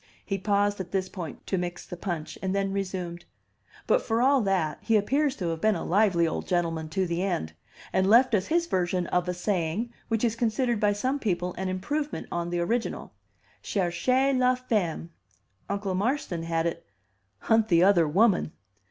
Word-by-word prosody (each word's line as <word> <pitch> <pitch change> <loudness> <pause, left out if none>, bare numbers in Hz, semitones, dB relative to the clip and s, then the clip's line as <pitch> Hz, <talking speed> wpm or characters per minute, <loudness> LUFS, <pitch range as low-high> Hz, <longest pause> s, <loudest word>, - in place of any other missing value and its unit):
He 195 -2 -2
paused 205 +1 +1
at 185 -2 -5
this 190 -1 -1
point 170 -6 -7
to 190 - -1
mix 175 0 -5
the 180 - -7
punch, 170 -4 -4
and 190 0 -1
then 195 -1 0
resumed: 180 -3 -4 0.6
"But - - +3
for 225 0 0
all 270 +2 +4
that, 190 -7 0
he 225 -1 +3
appears 275 +7 +1
to 175 -3 -3
have 165 -1 -3
been 215 -1 +3
a 165 - -4
lively 185 -3 +3
old 160 - -3
gentleman 165 -3 -1
to 190 +3 0
the 170 0 -2
end, 175 - -2 0.4
and 190 +1 +2
left 240 +3 +6
us 195 -2 +2
his 335 +1 +2
version 180 - 0
of 180 +1 0
a - - 0
saying 190 +4 -1
which 225 0 -1
is 230 -2 +2
considered 235 0 0
by 210 -1 +3
some 260 +7 -1
people 180 -6 -1
an 190 +1 -3
improvement 285 +12 -3
on 170 0 -2
the 175 0 -1
original, 230 +7 -2 0.5
'Cherchez 255 +9 +1
la 255 0 +4
femme.' 205 -10 -2 0.6
Uncle 200 -1 -2
Marston 200 - -1
had 165 0 -1
it, 170 - -2 0.6
'Hunt 225 -1 +3
the 170 -3 +4
other 180 -4 +5
woman. 190 0 +3
195 Hz, 185 wpm, -27 LUFS, 175-225 Hz, 0.6 s, left